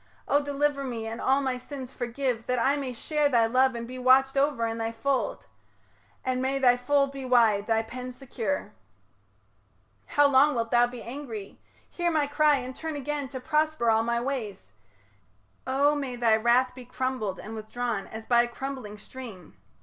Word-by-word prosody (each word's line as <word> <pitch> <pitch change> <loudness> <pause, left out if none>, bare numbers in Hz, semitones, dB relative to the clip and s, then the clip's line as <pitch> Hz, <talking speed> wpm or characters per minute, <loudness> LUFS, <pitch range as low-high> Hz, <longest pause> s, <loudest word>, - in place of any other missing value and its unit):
O 285 - +3
deliver 285 0 0
me 235 -4 -4
And 225 +1 -5
all 270 +1 +3
my 260 -2 -1
sins 260 -1 -8
forgive, 245 -1 -2
that 250 - +1
I 270 +4 +3
may 275 -3 -3
share 295 +4 0
Thy 235 -4 +4
love 255 +2 +3
and 235 0 -5
be 255 +1 -7
watched 265 +2 +4
over 275 -4 +2
in 225 0 -3
thy 225 0 -1
fold; 250 +4 -1 0.8
And 255 0 0
may 265 +1 0
thy 250 -2 +5
fold 275 +2 +1
be 275 -1 -7
wide, 230 -5 +3
thy 225 -1 +2
pen 250 +2 -7
secure. 260 +1 -4 1.3
How 290 - +4
long 280 +1 +5
wilt 230 -1 -2
thou 240 0 +5
be 245 -1 -9
angry? 235 -5 -7 0.3
Hear 345 -1 -1
my 310 -3 +2
cry, 295 +1 +3
And 255 -1 -5
turn 320 -1 -5
again 290 0 -3
to 260 0 -6
prosper 305 -3 +1
all 220 0 +3
my 235 +1 0
ways 230 - -4 1.0
O 280 +3 +3
may 275 -4 -3
thy 235 -2 +3
wrath 240 +3 +3
be 255 0 -10
crumbled 250 -6 -3
and 220 - -8
withdrawn 220 -1 -3
As 220 0 -8
by 240 0 +5
a 240 - 0
crumbling 240 -4 -6
stream. 215 -6 -11
255 Hz, 180 wpm, -27 LUFS, 230-275 Hz, 1.3 s, thy